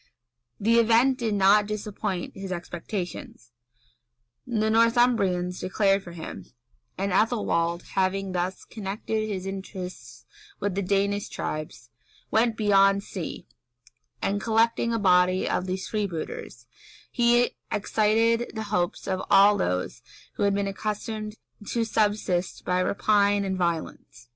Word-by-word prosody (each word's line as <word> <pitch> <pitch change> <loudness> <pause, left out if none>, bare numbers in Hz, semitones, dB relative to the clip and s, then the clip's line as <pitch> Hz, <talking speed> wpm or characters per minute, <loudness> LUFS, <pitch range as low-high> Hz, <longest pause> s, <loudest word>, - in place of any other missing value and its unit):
The 230 +3 +4
event 235 +3 +4
did 225 -3 0
not 205 +1 +5
disappoint 210 -3 -4
his 195 -1 -6
expectations: 175 - -6 1.0
the 220 -3 0
Northumbrians 225 -6 +2
declared 195 +1 +2
for 175 -3 -11
him,[] 160 - -8 0.5
and 195 +1 -1
Ethelwald, 180 -5 +1
having 195 0 0
thus 180 +1 -3
connected 215 +1 -3
his 190 -2 -4
interests 190 -1 -7 0.3
with 200 -1 -1
the 200 - -1
Danish 200 +1 0
tribes, 150 -6 -6 0.4
went 225 0 +2
beyond 195 -2 +4
sea, 185 -5 -6 0.8
and 205 +1 0
collecting 230 +1 +2
a 230 - +1
body 185 -2 +3
of 185 - -1
these 185 +1 -3
freebooters, 170 - -4 0.5
he 240 0 +3 0.2
excited 225 +3 +1
the 220 - -3
hopes 175 -3 -1
of 185 -1 -1
all 200 +1 +7
those 90 - -2 0.3
who - - -7
had 200 -1 +3
been 200 0 0
accustomed 215 +2 -4 0.3
to 235 - 0
subsist 205 -5 0
by 180 0 +1
rapine 200 +1 +2
and 190 -1 -1
violence. 165 -8 -4
200 Hz, 125 wpm, -26 LUFS, 185-215 Hz, 1.0 s, all